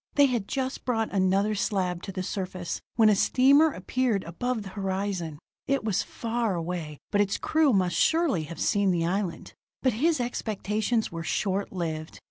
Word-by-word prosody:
They 285 - +7
had 240 -7 -1
just 265 0 -3
brought 225 -4 -1
another 195 +2 +2
slab 185 -4 -1
to 195 - -6
the 185 -1 -4
surface, 185 -3 -4
when 225 -2 +5
a 210 - +5
steamer 280 +9 +5
appeared 225 0 -1
above 225 +7 -3
the 195 - -8
horizon. 190 -5 -3 0.3
It 275 -2 +1
was 210 -3 +1
far 230 -3 -2
away, 165 -3 -4
but 205 - +3
its 200 -1 0
crew 315 -3 +2
must 185 -5 +2
surely 320 - +2
have 170 +2 -9
seen 200 -1 +2
the 170 -2 +1
island. 185 0 -2 0.3
But 255 - +3
his 310 +7 +2
expectations 220 -1 -1
were 165 0 -5
short 195 +4 -1
lived. 160 -4 -4
200 Hz, 170 wpm, -27 LUFS, 180-240 Hz, 0.3 s, They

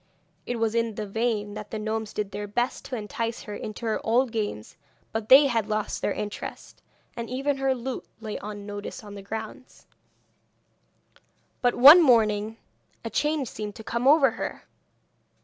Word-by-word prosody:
It 245 - -1
was 225 -1 0
in 230 -2 0
vain 210 0 -2
that 210 0 -7
the 220 - -4
gnomes 220 0 -3
did 205 -2 -3
their 205 +1 -5
best 240 +5 -1
to 260 - -4
entice 230 +1 -4
her 210 - -7
into 215 +3 -6
her 220 - -1
old 240 +2 +2
games, 205 - -4 0.4
they 240 +6 +6
had 230 -6 0
lost 215 -1 -2
their - - 0
interest, 210 0 -6 0.3
and 235 -1 -5
even 275 +3 -1
her 270 -1 +1
lute 255 +1 -5
lay 220 -2 -5
unnoticed 205 +2 -7
on 205 -1 -10
the 200 - -8
ground. 220 +5 -8 1.8
But 245 -1 +2
one 290 +8 +10
morning 220 -5 +3 0.5
a - - -4
change 295 -3 0
seemed 210 -1 -6
to 220 - -10
come 235 +3 -1
over 280 -3 +6
her. - - -5
225 Hz, 160 wpm, -26 LUFS, 210-245 Hz, 1.8 s, one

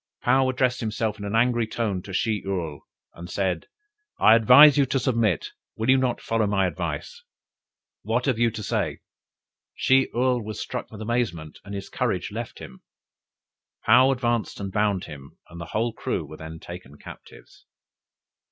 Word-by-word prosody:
Paou 130 0 +3
addressed 125 -1 0
himself 110 -1 -2
in 100 - -6
an 100 +2 -3
angry 120 -1 +2
tone 105 -5 -2
to 95 - -10
Shih 105 +2 0
Url, 85 -7 -3 0.3
and 85 +1 -10
said: 95 -3 -2 0.5
'I 110 - +7
advise 125 +6 +8
you 140 -2 +3
to 135 - 0
submit: 115 - 0 0.3
will 110 +4 +1
you 135 - +5
not 125 -2 0
follow 115 -2 0
my 100 -1 +1
advice? 475 - -4 0.8
what 120 +3 -1
have 130 -5 0
you 120 0 +4
to 110 -1 -7
say?' - - -2 0.7
Shih 130 0 +3
Url 125 -1 +1
was 105 0 -6
struck - - -5
with 110 0 -8
amazement, 105 -10 -2
and 100 +1 -7
his 100 0 -6
courage - - -2
left - - -6
him. 65 - -11 1.1
Paou 130 +4 +6
advanced 120 -3 -1
and 100 -1 -5
bound 105 -2 0
him, 70 -2 -11
and 85 +1 -10
the - - -5
whole 115 +6 -2
crew - - -3
were 80 - -11
then 80 0 -8
taken 85 -5 -10
captives." - - -14
110 Hz, 170 wpm, -25 LUFS, 95-125 Hz, 1.1 s, advise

